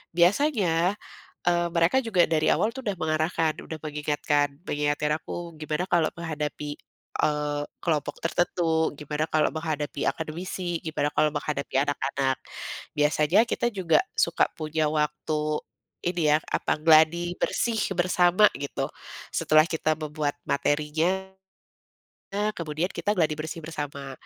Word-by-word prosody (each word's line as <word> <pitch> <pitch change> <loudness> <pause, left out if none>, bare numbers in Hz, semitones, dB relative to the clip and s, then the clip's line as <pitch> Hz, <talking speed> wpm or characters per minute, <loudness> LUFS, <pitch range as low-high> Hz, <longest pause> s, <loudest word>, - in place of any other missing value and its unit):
biasanya, 185 - +3 0.5
eee, 175 0 +3
mereka 170 +8 +4
juga 185 -7 +3
dari 155 -1 +1
awal 215 - +2
tuh 265 - -6
udah 200 - 0
mengarahkan 155 0 +1
udah 160 -1 -7
mengingatkan 150 -1 0 0.2
mengingatkan 150 0 0
aku 170 +1 -6
gimana 155 +4 -2
kalau 170 -3 +2
menghadapi, 150 -2 -4 0.5
eee, 150 -1 0 0.2
kelompok 155 -4 -1
tertentu 165 -1 +1
gimana 150 +1 -2
kalau 155 -1 +3
menghadapi 155 -2 -3
akademisi 175 +2 -4
gimana 155 -2 -1
kalau 150 -1 +3
menghadapi 150 -2 -3
anak-anak, 135 -1 0 0.6
biasanya 150 +8 +3
kita 235 - 0
juga 180 -4 +3 0.2
suka - - +3
punya 155 -1 0
waktu, 150 0 -1 0.5
ini 170 -4 +1
ya 150 - +6
apa - - +1
gladi 165 +2 +5
bersih 230 -2 +1 0.2
bersama 180 +2 +5
gitu, 140 - -3 0.4
setelah 155 0 +4
kita 155 -1 +1
membuat 150 -1 -2
materinya 160 +7 0 1.3
kemudian 160 +2 -2
kita 205 - 0
gladi 160 -4 +2
bersih 160 +2 -5
bersama 145 -3 -5
155 Hz, 120 wpm, -26 LUFS, 150-175 Hz, 1.3 s, ya